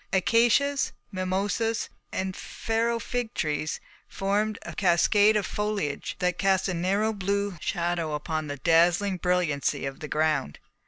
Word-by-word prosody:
Acacias, 240 +8 +3 0.2
mimosas, 200 +4 -1 0.2
and 190 0 -3
Pharaoh 230 +1 -1
fig 240 +1 -3
trees 155 0 -1 0.3
formed 205 +2 -1
a - - -7
cascade 205 +4 +4
of 205 - -1
foliage 210 -9 -2
that 180 -1 -1
cast 190 -1 +2
a 185 - -1
narrow 195 +6 +1
blue 200 0 -1
shadow 170 -3 -1
upon 155 +1 -3
the 145 0 -5
dazzling 175 +6 +3
brilliancy 170 -6 0
of 135 0 -5
the 150 - -6
ground. 150 - 0
185 Hz, 130 wpm, -27 LUFS, 165-210 Hz, 0.3 s, cascade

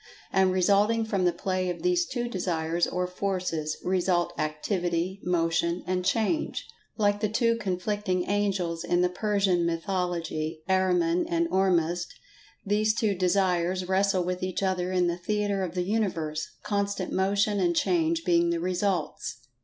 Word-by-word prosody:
And, 190 -1 +4
resulting 205 +5 +3
from 195 -4 0
the 175 - +4
play 185 +1 -2
of 180 - -5
these 355 -1 +2
two 240 -2 -2
Desires, 170 -5 -1
or 180 0 -1
Forces, 180 -4 -2
result 180 -1 +1
Activity, 175 +4 -2
Motion 170 0 0
and 180 0 -1
Change. 225 - 0 0.3
Like 205 -2 +2
the 215 -1 0
two 230 +2 +2
conflicting 190 -2 -1
angels 190 -5 0
in 175 0 +1
the 180 - +3
Persian 195 -2 +1
mythology—Ahriman 170 - 0
and 335 0 +1
Ormuzd—these 190 +4 -1
two 220 -3 +1
Desires 185 -1 +1
wrestle 190 0 +2
with 180 +1 -3
each 185 +1 -2
other 185 -1 0
in 180 -1 +2
the 170 0 0
theatre 205 +1 -1
of 180 -2 -3
the 180 - 0
Universe—constant 200 +1 -2
Motion 200 +2 +1
and 175 -2 +2
Change 165 -2 +1
being 170 -1 +3
the 170 0 0
results. 175 - -2
185 Hz, 140 wpm, -27 LUFS, 175-200 Hz, 0.3 s, And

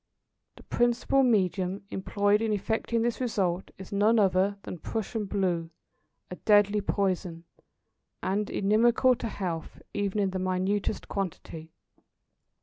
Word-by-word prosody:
The - - -15
principal 240 +3 +2
medium 190 -5 +1
employed 205 +2 +1
in 225 -1 0
effecting 220 +2 0
this 240 +2 -1
result 190 -7 -1
is 190 -1 -10
none 210 +3 +3
other 195 0 +2
than 175 - -7
Prussian 220 +3 -3
blue, 180 -4 -1 0.6
a 180 - -6
deadly 205 -1 +4
poison, 185 -4 -1 0.8
and 200 +2 -1
inimical 230 +5 +3
to 235 - -4
health 175 -6 -5
even 205 0 -1
in 200 -2 +1
the 185 - -3
minutest 185 +3 -1
quantity. 165 -4 -5
200 Hz, 125 wpm, -28 LUFS, 185-215 Hz, 0.8 s, deadly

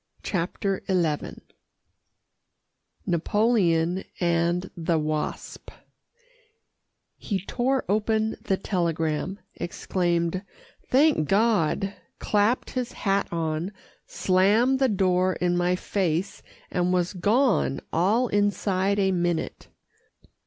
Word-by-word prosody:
CHAPTER 190 +1 -2
XI 170 -6 -1 1.6
NAPOLEON 180 -1 +1 0.2
AND 170 +1 0
THE 170 0 0
WASP 155 0 -3 1.5
He 195 -3 -3
tore 260 +2 0
open 220 +2 +1
the 190 - 0
telegram, 170 0 -1 0.2
exclaimed 175 0 -1 0.5
"Thank 275 - +3
God," 200 -2 +2 0.2
clapped 210 +4 +1
his 250 -1 -3
hat 195 -2 0
on, 165 +2 -2 0.4
slammed 210 +8 +2
the 265 -1 +3
door 185 -2 +2
in 175 -1 0
my 175 +1 +2
face, 180 -2 -2 0.3
and 180 0 +1
was 180 0 +1
gone 210 - +2
all 210 +9 +2
inside 200 -1 +1
a 195 -1 +2
minute. 175 -2 -2
185 Hz, 90 wpm, -25 LUFS, 170-205 Hz, 1.6 s, Thank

